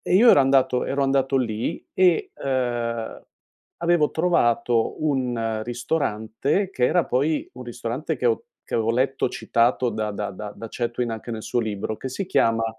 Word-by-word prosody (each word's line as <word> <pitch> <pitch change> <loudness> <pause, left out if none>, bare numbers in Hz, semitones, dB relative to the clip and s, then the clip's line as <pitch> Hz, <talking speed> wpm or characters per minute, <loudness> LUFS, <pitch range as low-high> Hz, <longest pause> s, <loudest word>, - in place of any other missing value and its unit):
e - - 0
io 230 +5 +8
ero 140 - +7
andato 135 -2 +3
ero 140 0 0
andato 135 0 +2
lì 115 -3 -2
e, 180 -3 +3
ehm, 120 -3 -2 0.6
avevo 170 -3 +2
trovato 120 -8 +1
un 120 -6 0
ristorante, 120 - -1
che 125 -7 +1
era 175 +4 +2
poi 145 +5 0
un 125 - -8
ristorante 120 +6 -4
che 125 - -1
ho 115 - +1 0.2
che - - -5
avevo 115 0 +1
letto 130 +2 +1
citato 120 +1 +1
da 110 -1 -2
da 105 0 -3
da 105 +2 -7
da 115 - -7
Chatwin 120 0 -2
anche 115 +1 -6
nel 110 -1 -5
suo 120 - -1
libro, 110 0 -3
che 130 - -5
si 160 +10 -4
chiama, 115 -10 +2
125 Hz, 170 wpm, -24 LUFS, 115-140 Hz, 0.6 s, io